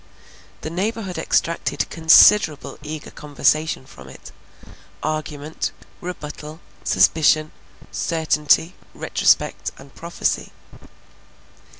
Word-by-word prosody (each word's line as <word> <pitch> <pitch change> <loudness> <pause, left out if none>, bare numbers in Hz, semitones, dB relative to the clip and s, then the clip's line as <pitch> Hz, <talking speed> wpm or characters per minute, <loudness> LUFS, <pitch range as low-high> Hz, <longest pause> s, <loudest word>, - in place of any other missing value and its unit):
The 155 - -5
neighborhood 195 +1 -3
extracted 170 0 0
considerable 160 0 +5
eager 155 0 -7
conversation 150 0 0
from 65 - -14
it; - - -13 0.7
argument, 155 0 -3 0.3
rebuttal, 155 -3 -7 0.2
suspicion, 155 -1 +3 0.4
certainty, 160 +1 +1 0.2
retrospect, - - +1
and 135 0 -15
prophecy. 170 +1 -3
155 Hz, 75 wpm, -21 LUFS, 150-170 Hz, 0.7 s, considerable